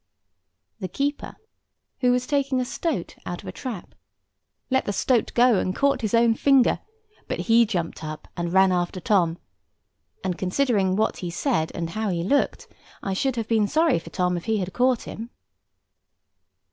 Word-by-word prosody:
The 185 - -3
keeper, 285 - -3 0.6
who 250 -1 +3
was 250 0 +1
taking 275 -2 0
a 250 - 0
stoat 270 - -3
out 175 -1 -6
of - - -11
a - - -4
trap, 240 -9 -7 0.8
let 265 0 +2
the 205 - -1
stoat 240 +3 +1
go, 240 -4 +5
and 185 - -1
caught 280 0 +2
his 220 0 0
own 230 0 +5
finger; 270 +1 +4 0.5
but - - -2
he 230 0 +4
jumped 175 -6 -3
up, 155 0 -7
and 170 -1 -3
ran 190 +1 +5
after 180 0 -1
Tom; 175 -3 +2 0.9
and 180 -2 -2
considering 195 -1 +1
what 215 +2 +1
he 175 - -4
said, 170 - 0
and 165 -1 -3
how 215 +1 -2
he 170 -2 -1
looked, 280 +10 0 0.4
I 195 - -1
should 265 +6 0
have 225 -2 -3
been 220 -3 +2
sorry 315 - +3
for 165 - -11
Tom 180 +1 0
if 170 - -7
he 220 -1 +1
had 185 -2 -3
caught 250 -1 +2
him. 225 +2 -7
215 Hz, 175 wpm, -24 LUFS, 180-255 Hz, 0.9 s, go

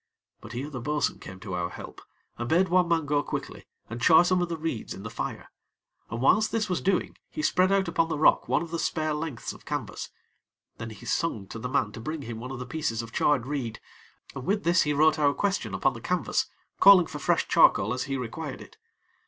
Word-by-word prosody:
But - - -11
here 140 +5 -5
the 125 -4 -5
bo'sun 150 +3 -1
came 95 0 -10
to 95 -3 -6
our 90 -1 -1
help, - - -10 0.3
and 120 0 -4
bade 180 +3 +3
one 180 0 +3
man 165 -2 +1
go 145 0 +1
quickly - - -6 0.2
and 120 +1 -7
char 160 +6 +7
some 180 0 +2
of 175 - -1
the 165 - -3
reeds 155 -8 -4
in 95 - -10
the 105 - -6
fire, - - -5 0.6
and 115 - -4
whilst 215 - +3
this 220 -2 0
was 180 - -1
doing 190 -1 0
he 310 - -5
spread 185 - +3
out 195 -1 +2
upon 165 0 +1
the 160 - -1
rock 155 - +4
one 155 - +2
of 170 - -9
the 170 - -2
spare 155 -2 -1
lengths 150 -5 -4
of - - -15
canvas; - - -4 0.7
then 115 - -5
he 110 - -11
sung 140 -12 -1
out 95 - -16
to 115 - -6
the 125 - -4
man 125 -6 +1
to 110 - -9
bring 155 +5 -5
him 115 -2 -6
one 125 +2 -7
of 135 - -5
the 125 - -6
pieces 120 -4 -2
of 115 - -10
charred 140 -5 +2
reed, 130 -5 -4 0.5
and 135 -1 -7
with 205 +1 +1
this 175 +1 +4
he 150 - +1
wrote 155 +2 +4
our 145 -1 +3
question 200 -1 -1
upon - - +1
the - - -9
canvas, - - 0 0.3
calling 195 -3 +8
for 150 - -7
fresh - - +1
charcoal 105 +4 +4
as 125 - -2
he 135 -1 -2
required 130 +4 -5
it. - - -14
150 Hz, 235 wpm, -27 LUFS, 120-170 Hz, 0.7 s, calling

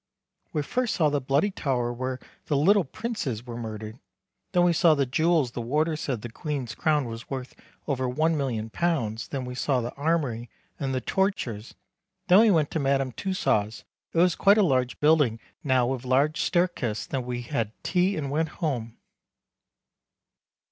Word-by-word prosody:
We 150 - -1
first 245 - -1
saw 155 -5 +3
the 145 -1 0
Bloody 140 +10 +1
Tower 125 -8 -1
were 130 +1 -3 0.3
the 145 - +1
little 195 +7 +4
Princes 135 - -4
were 120 -2 -7
murdered 110 0 -6 0.5
then 180 -2 +3
we 175 -1 +4
saw 165 -1 +5
the 140 -1 +1
jewels 155 0 +2
the 120 - -5
warder 155 +7 0
said 135 -8 -3
the 120 - -6
Queen's 140 -4 -4
crown 150 -3 +1
was 115 0 -8
worth 130 -2 -5 0.3
over 130 -3 0
£1,000,000 130 -3 -1
then 135 -3 -3
we 125 - -6
saw 130 +1 0
the 120 0 -4
armory 140 -6 -1 0.3
and 135 -1 -2
the 130 - -1
torture's, 125 - -2 0.5
then 185 +3 +8
we 225 0 +6
went 160 -7 +2
to 160 - -1
Madame 135 -2 +1
Tussaus 110 - -1 0.3
it 165 - 0
is 180 -1 +4
quite 200 +2 +4
a 215 - +5
large 130 -7 +1
building 145 -7 +3 0.2
now 130 -3 +3
with 130 0 -2
a - - -9
large 140 +4 +2
stairkes 140 - 0
then 130 -2 -3
we 120 0 -4
had 115 -4 -2
tea 180 +2 +1
and 140 -3 -3
went 160 +2 0
home. 125 -10 -3
135 Hz, 170 wpm, -26 LUFS, 120-160 Hz, 0.5 s, then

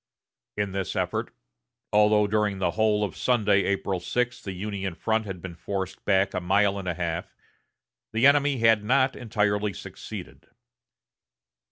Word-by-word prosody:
In 105 -1 -1
this 95 -2 -3
effort, - - -2 0.6
although 105 0 +5
during 105 -1 0
the 95 - 0
whole 105 -1 +2
of 100 - -3
Sunday, 105 -5 +2
April 100 -1 -1
6, 120 +6 -2
the 95 - -5
Union 95 -1 -4
front 110 +2 -1
had 95 -3 -7
been 90 -2 -6
forced 95 +2 -5
back 95 -1 +2
a 90 - -2
mile 100 +2 +2
and 95 - -7
a 90 - -1
half, 85 -1 -4 0.8
the 115 +3 +2
enemy 140 -1 +5
had 115 -2 +4
not 130 +3 +2
entirely 105 -3 0
succeeded. - - -9
105 Hz, 150 wpm, -26 LUFS, 95-110 Hz, 0.8 s, although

